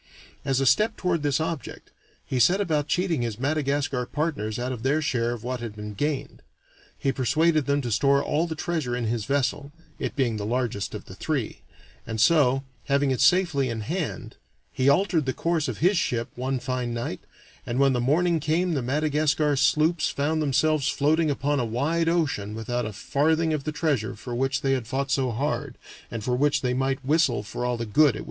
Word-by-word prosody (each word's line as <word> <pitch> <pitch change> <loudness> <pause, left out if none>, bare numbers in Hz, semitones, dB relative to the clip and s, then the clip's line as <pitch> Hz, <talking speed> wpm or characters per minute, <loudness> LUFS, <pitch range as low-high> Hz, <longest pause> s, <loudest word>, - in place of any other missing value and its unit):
As 135 -2 +1
a 135 - +1
step 215 - +3
toward 175 -3 0
this 145 0 +1
object, 160 -5 -5 0.3
he 130 - -2
set 180 - +4
about 155 -7 0
cheating 175 -6 0
his 115 -3 -3
Madagascar 140 -2 0
partners 140 -9 -2
out 125 +1 -2
of 125 -3 -5
their 140 +5 +2
share 125 -6 0
of 120 -2 -4
what 125 +1 -3
had 115 -3 -6
been 105 0 -7
gained. 145 +7 -3 0.6
He 135 - 0
persuaded 155 +4 +2
them 140 0 +2
to 120 -3 -4
store 140 +5 +3
all 160 +3 0
the 160 - -4
treasure 155 -7 -2
in 120 -1 -2
his 110 -1 -1
vessel, 140 +1 -1 0.3
it - - -3
being 120 -6 0
the 105 - -4
largest 120 -4 -2
of - - -7
the - - -11
three; - - -3 0.5
and 110 -1 -4
so, 135 +1 +4 0.2
having 140 0 +2
it 130 - 0
safely 170 -8 +3
in 115 -1 -3
hand, 160 - -4 0.4
he 130 +1 +2
altered 160 -1 +2
the 130 - +1
course 165 -2 0
of 120 -5 -4
his 180 +3 +3
ship 120 -1 -1
one 130 +2 -2
fine 125 -2 -3
night, 115 -5 -4 0.4
and 120 - -3
when 135 0 +4
the 125 - 0
morning 165 +6 +2
came 165 +4 0
the 140 - 0
Madagascar 150 +2 +1
sloops 155 +4 +2
found 155 +3 0
themselves 150 +1 +2
floating 155 +2 +2
upon 145 0 0
a - - +1
wide 150 +9 0
ocean 140 -12 -1
without 120 +1 -2
a - - -5
farthing 160 +8 +1
of 150 -3 -3
the 155 - -1
treasure 145 -7 -1
for 120 - -7
which 135 +2 0
they 135 - +1
had 125 -4 -2
fought 135 +3 -2
so 135 -2 +1
hard, 135 +6 -2 0.3
and 115 -2 -5
for 125 +2 0
which 145 +3 +2
they 125 -1 0
might 135 +1 -1
whistle 145 -7 +2
for 110 +3 -5
all 125 -1 0
the 115 - -3
good 105 +7 -3
it - - +10
would 150 - +7
do - - -3
them. - - -6
140 Hz, 210 wpm, -25 LUFS, 125-155 Hz, 0.6 s, it